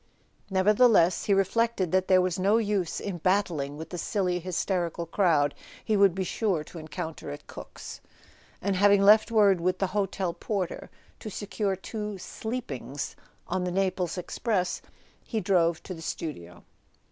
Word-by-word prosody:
Nevertheless, 200 -1 +4
he 200 - +3
reflected 195 -1 +1
that 185 0 +2
there 185 -1 +5
was 185 -1 -1
no 200 +4 +4
use 205 -6 0
in 190 -4 -5
battling 165 -6 0
with 160 - -8
the 175 - -4
silly 180 -2 0
hysterical 175 -1 -2
crowd 160 -5 +2 0.3
he 220 - +2
would 200 -3 +5
be 190 - -1
sure 185 -3 -1
to 165 - -10
encounter 160 0 -6
at 70 - -8
Cook's; - - -10 0.6
and 200 0 +1
having 200 +1 +5
left 215 +3 +6
word 205 -5 +4
with 185 +1 +1
the 195 - +1
hotel 195 -3 -1
porter 195 -3 -3 0.3
to 220 - -6
secure 205 -1 -2
two 210 +1 -5
"sleepings" 175 - -5 0.3
on 185 +1 -1
the 180 - -2
Naples 185 -2 -1
express, 180 +1 -1 0.4
he 225 - -2
drove 175 -4 +2
to 185 - -6
the 165 - -9
studio. 90 - -6
185 Hz, 155 wpm, -27 LUFS, 170-205 Hz, 0.6 s, left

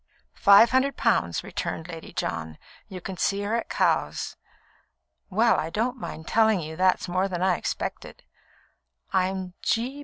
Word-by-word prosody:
"Five 200 +4 +7
hundred 265 +2 +2
pounds," 85 -1 +1
returned 160 - -4
Lady 165 -2 -9
John. 80 -1 -4 0.3
"You 185 -3 -8
can 190 +1 -6
see 200 +3 0
her 210 +3 -1
at 235 - -3
Cowes." - - 0 0.9
"Well, 225 +4 +3
I 160 - -2
don't 235 +8 -1
mind 160 -6 -7
telling 220 -3 +3
you 160 -1 -6
that's 185 +2 +2
more 185 +2 0
than 180 -2 -3
I 185 -1 +3
expected. - - -5 0.9
I'm 185 -1 0
G. 250 +5 -1
190 Hz, 150 wpm, -26 LUFS, 175-225 Hz, 0.9 s, Five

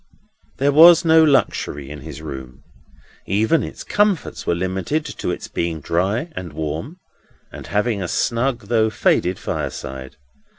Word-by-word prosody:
There 140 +2 +2
was 170 +4 +8
no 160 0 +6
luxury 75 - +1
in 75 -1 -8
his 75 0 -9
room. 65 -4 -8 0.6
Even 110 - +2
its - - -7
comforts 205 -4 0
were 85 - +2
limited 95 - -2
to - - -5
its - - -4
being 85 -1 -3
dry 95 - -1
and 85 -4 -6
warm, 80 - -5 0.5
and - - -10
having 105 0 0
a 90 - -2
snug 120 +6 0
though 110 0 +2
faded 95 -3 +1
fireside. 65 +1 -5
100 Hz, 140 wpm, -20 LUFS, -, 0.6 s, was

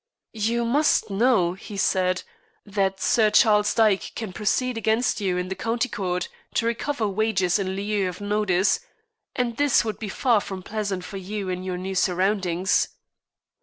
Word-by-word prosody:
"You 230 +2 0
must 280 -3 +2
know," 195 -4 +3
he 200 +2 -9
said, 185 -1 +1 0.4
"that 195 -2 -1
Sir 215 +3 +3
Charles 210 -2 +4
Dyke 215 -4 +2
can 215 -5 -5
proceed 250 +5 0
against 225 0 +1
you 185 -3 0
in 180 0 -2
the - - -1
County 230 +4 -1
Court 180 -3 -2 0.3
to 230 - +1
recover 235 0 -1
wages 195 -2 +1
in 190 -1 -2
lieu 200 -1 -1
of 180 - -8
notice, 205 - +1 0.6
and 240 -2 -1
this 285 -4 +3
would 215 -3 -4
be 215 - -5
far 235 0 +2
from 190 -2 -7
pleasant 200 -3 -3
for 200 - -7
you 195 +1 -4
in 180 0 -3
your 185 -1 -4
new 190 +1 -4
surroundings." 185 -1 +1
205 Hz, 165 wpm, -24 LUFS, 185-225 Hz, 0.6 s, Charles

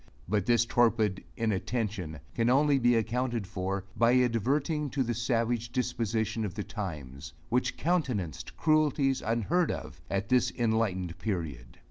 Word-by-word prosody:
But 100 0 0
this 120 -1 +4
torpid 115 -5 +2
inattention 105 - -2
can 115 0 +1
only 140 +2 +4
be 120 -1 +4
accounted 115 0 0
for, 95 +1 -3
by 120 +1 +4
adverting 135 +6 +1
to 135 -1 +1
the 120 -1 -1
savage 115 0 0
disposition 115 -3 -1
of 100 -4 -4
the 105 - -3
times, 75 - -6 0.2
which 125 +1 0
countenanced 125 - -1
cruelties 145 -4 +2
unheard 120 - +1
of - - -5
at 100 0 -2
this 125 -1 +3
enlightened 100 -7 0
period. 80 - -4
115 Hz, 135 wpm, -29 LUFS, 100-125 Hz, 0.2 s, this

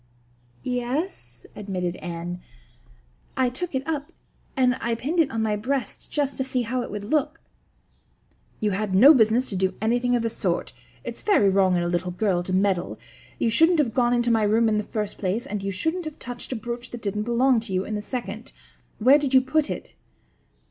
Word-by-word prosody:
"Y - - -2
e 250 - +1
e - - -5
s," 240 - -4
admitted 185 -4 -3
Anne, 175 0 -6 1.0
"I 260 -1 +3
took 325 +4 -3
it 265 +2 -2
up 305 0 -3 0.5
and 250 -1 +3
I 235 0 0
pinned 295 +9 -2
it 310 -4 +4
on 225 -1 -2
my 215 -1 +1
breast 250 +2 -3
just 285 -2 -1
to 265 - 0
see 255 -1 0
how 250 +2 -2
it - - -5
would 205 0 -5
look." 300 +7 0 1.2
"You 210 -1 0
had 195 0 -1
no 270 +11 +9
business 235 0 +3
to 195 - -4
do 190 0 0
anything 245 +3 +1
of 235 - 0
the 230 - 0
sort. - - -2 0.3
It's - - -6
very 385 - +4
wrong 190 -1 +3
in 175 - 0
a - - -1
little 175 +1 -1
girl 180 0 0
to 180 - -5
meddle. 185 -1 +1 0.4
You 230 - +1
shouldn't 325 +8 +5
have 265 -8 +1
gone 240 -1 +2
into 240 0 +2
my 225 -1 +3
room 220 +2 +3
in 215 -1 +2
the - - -2
first 210 -2 -3
place 200 +4 -1
and 205 0 -4
you 195 0 -2
shouldn't 320 - -2
have 310 0 -6
touched 245 0 -7
a - - -1
brooch 240 +2 -5
that 240 -2 -9
didn't 210 0 -1
belong 245 +1 +3
to 225 -2 -6
you 185 +1 0
in 215 - -5
the 210 - -2
second. 220 -1 -6 0.4
Where 260 +6 +6
did 275 -2 0
you 260 - +8
put 295 +3 0
it?" - - -6
230 Hz, 215 wpm, -24 LUFS, 200-260 Hz, 1.2 s, no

